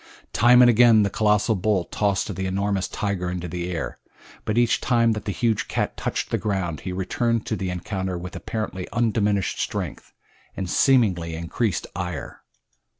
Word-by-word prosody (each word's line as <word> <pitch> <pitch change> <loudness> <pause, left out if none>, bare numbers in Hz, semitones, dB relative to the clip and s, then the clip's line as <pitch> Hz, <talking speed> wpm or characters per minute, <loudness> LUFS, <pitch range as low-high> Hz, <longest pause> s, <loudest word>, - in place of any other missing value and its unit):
Time 125 +2 +6
and - - +7
again 115 -2 +6
the 100 - 0
colossal 105 +1 +2
bull 100 -1 +1
tossed 100 +1 -1
the 95 +1 -2
enormous 100 0 -1
tiger 100 -3 -2
high 90 - -2
into 90 -1 -4
the 90 +1 -4
air, 85 -3 -4 0.5
but 110 - -1
each 120 -1 +3
time 115 -2 +3
that 110 -1 -3
the 105 - -1
huge 115 +1 0
cat - - -2
touched - - -3
the - - +1
ground 95 -7 -2
he 95 - -5
returned 110 +5 -1
to 110 - -1
the 95 -2 -3
encounter 95 +1 -3
with 90 +1 -7
apparently 105 -5 -4
undiminished 105 -4 +1
strength, - - -4 0.5
and 95 - -3
seemingly 95 -11 +3
increased 85 +5 -2
ire. 90 -3 -5
100 Hz, 170 wpm, -24 LUFS, 90-110 Hz, 0.5 s, and